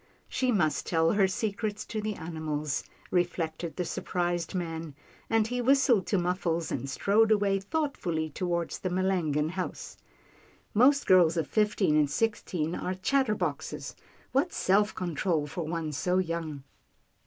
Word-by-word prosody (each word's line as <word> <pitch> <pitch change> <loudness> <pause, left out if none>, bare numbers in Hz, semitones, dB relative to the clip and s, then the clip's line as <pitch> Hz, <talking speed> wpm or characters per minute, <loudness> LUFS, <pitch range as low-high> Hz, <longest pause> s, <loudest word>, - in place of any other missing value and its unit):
" - - -36
She 255 -1 0
must 175 -9 +1
tell 165 -1 +3
her 200 -2 +4
secrets 210 +2 -2
to 215 - -4
the 210 0 -2
animals," 155 -4 -3 0.3
re 180 -1 +4
flected 165 -1 -5
the 180 - -2
surprised 175 0 -2
man, 165 -4 -4 0.3
and 225 -1 +3
he 245 +2 -2
whistled 255 -5 +4
to 200 - +2
Muffles, 175 -2 -1
and 135 - -3
strode 215 +9 +3
away 200 -2 +3
thoughtfully 195 - -2
toward 170 +1 -2
the 185 - -3
Melangon 175 -5 +1
house. 185 0 -5 0.4
" - - -28 0.3
Most 270 +6 +5
girls 175 -3 +5
of 160 - +1
fifteen 210 -4 +2
and 150 -2 +3
six 225 +8 0
teen 160 -2 -2
are 185 +1 -3
chatterboxes. 220 +3 -1 0.4
What 290 +7 +2
self 205 +3 +2
control 170 -2 -1
for 160 +3 -5
one 165 -1 -2
so 180 +5 0
young." 165 -5 -2
180 Hz, 155 wpm, -29 LUFS, 160-210 Hz, 0.4 s, Most